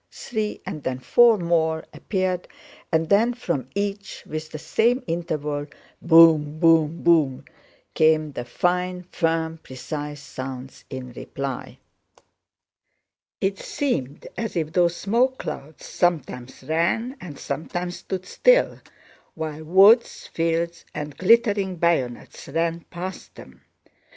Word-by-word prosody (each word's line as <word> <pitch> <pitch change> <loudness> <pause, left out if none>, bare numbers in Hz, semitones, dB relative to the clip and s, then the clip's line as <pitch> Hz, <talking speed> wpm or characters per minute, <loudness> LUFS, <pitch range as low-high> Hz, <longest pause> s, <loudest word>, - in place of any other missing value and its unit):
three 215 -4 -4
and 155 - -5
then 130 -2 -2
four 230 - +5
more 160 -3 0
appeared 185 -3 -2 0.4
and 160 -1 +2
then 230 +4 +3
from 145 - -3
each, 200 0 -3
with 155 0 -5
the 155 - -6
same 240 - +1
interval—"boom—boom, 160 0 +2
boom!" 155 -6 +3 0.5
came 155 -1 +3
the 120 - -5
fine, 180 +7 -1
firm, 165 -1 0
precise 145 +2 -6
sounds 130 -1 -8
in 130 -2 -7
reply. 135 +1 -6 1.6
It 195 0 0
seemed 145 - -3
as 225 -4 -4
if 160 -2 -2
those 175 -1 +3
smoke 245 +8 +1
clouds 150 +3 -7
sometimes 130 -8 -2
ran 170 - 0
and 155 -6 -8
sometimes 175 +4 -4
stood 185 -1 -5
still - - +3 0.6
while 155 -1 -5
woods, 195 +8 +5
fields, 170 +1 -1
and 150 -1 -5
glittering 200 0 +3
bayonets 160 -8 -1
ran 165 +3 -1
past 185 +2 -7
them. 65 - -14
165 Hz, 110 wpm, -24 LUFS, 150-185 Hz, 1.6 s, four